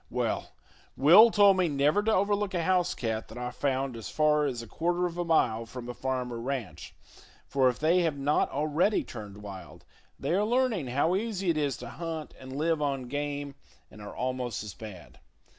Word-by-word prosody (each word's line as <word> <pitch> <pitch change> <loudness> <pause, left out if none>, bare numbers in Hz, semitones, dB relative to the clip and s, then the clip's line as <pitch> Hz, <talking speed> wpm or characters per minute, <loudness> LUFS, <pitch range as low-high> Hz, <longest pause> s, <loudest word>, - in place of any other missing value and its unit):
Well, - - -2 0.4
Will 180 - +8
told 200 -3 +5
me 185 -2 +3
never 145 +6 +2
to 220 +1 +1
overlook 205 -1 +1
a 170 - 0
house 180 0 +1
cat 110 -2 -3
that 110 - -11
I 125 0 -4
found 135 -1 -1
as 115 -2 -7
far 150 -1 +2
as 120 -4 -4
a - - -11
quarter 175 +8 -1
of 170 -1 -3
a - - +1
mile 115 -9 +1
from 125 0 -8
a 125 - -5
farm 130 -1 -3
or 115 - -5
ranch, 125 -5 -5 0.5
for 130 -2 +3
if 125 - -3
they 170 +4 +3
have 160 -4 0
not 140 +2 +1
already 155 +8 +1
turned 105 -3 -9
wild, 95 -5 -10 0.3
they 140 +4 -1
are 200 +3 +2
learning 230 - +1
how 145 +8 +1
easy 195 -4 -1
it 160 - -2
is 140 -4 -1
to 120 - -8
hunt 160 +3 -6
and 130 0 -9
live 160 0 +1
on 135 -4 -2
game, 145 0 -3 0.4
and 105 - -13
are 105 - -9
almost 125 -4 -3
as 105 -3 -7
bad. 105 -6 -11
145 Hz, 200 wpm, -28 LUFS, 125-175 Hz, 0.5 s, Will